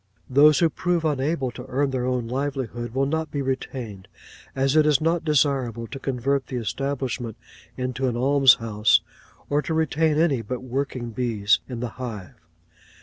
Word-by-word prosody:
Those 145 +3 +6
who 170 -2 +4
prove 175 -1 -1
unable 140 -2 0
to - - -9
earn 135 +2 0
their 125 -1 -1
own 125 -2 -1
livelihood 125 -3 -3
will 135 +1 +2
not 160 +3 -1
be 140 -1 -3
retained; 125 -7 -4 0.5
as 135 +1 +1
it 155 -1 +5
is 150 -3 +4
not 165 +1 +1
desirable 135 -6 +1
to 135 +4 -8
convert 135 +1 -1
the 130 - -5
establishment 125 0 -3 0.4
into 130 +1 -2
an 120 -2 -1
alms 135 0 +6
house, 110 -1 +2 0.5
or 145 +1 +1
to 160 - -3
retain 160 0 +1
any 155 -7 +2
but 125 +1 -5
working 130 -2 -3
bees 110 -3 +1
in 120 -2 -5
the 125 - -2
hive. 105 -7 -6
130 Hz, 165 wpm, -24 LUFS, 120-145 Hz, 0.5 s, Those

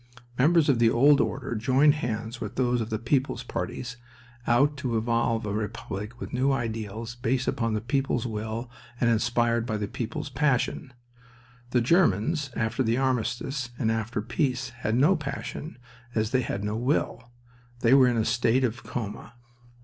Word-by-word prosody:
Members 155 +5 +4
of 135 -5 +3
the 115 -1 +5
old 140 +5 +5
order 130 -2 -2
joined 130 +6 +4
hands 115 -5 -4
with 105 - -5
those 125 -2 +1
of 110 - -4
the 110 - -1
people's 125 +1 0
parties, 125 +4 -5 0.5
out 140 +5 +4
to 125 -5 -1
evolve 115 0 0
a 105 - -2
republic 105 +1 -5
with - - -7
new 130 +2 +2
ideals 115 -2 -3
based 125 +2 -1
upon 115 -2 0
the 105 - -1
people's 130 0 0
will 110 +1 -4 0.3
and 120 -1 +3
inspired 115 0 +2
by 110 -3 -1
the 105 -1 -2
people's 145 +9 -4
passion. 130 -1 0 0.8
The 125 -1 +2
Germans, 145 - +2
after 110 +4 -1
the 115 -1 +2
armistice 130 +1 -1
and 110 -3 +1
after 110 0 -2
the - - -12
peace, 130 +1 -1
had 120 -3 -2
no 150 +10 +5
passion, 145 0 -5 0.4
as 110 0 0
they 130 -1 +3
had 100 -4 -3
no 105 +1 -2
will. 125 0 -1 0.5
They 115 +2 +5
were 135 -2 +7
in 120 -1 +1
a 110 - +1
state 120 +2 +2
of 120 -1 -1
coma. 110 0 -6
120 Hz, 170 wpm, -27 LUFS, 110-130 Hz, 0.8 s, were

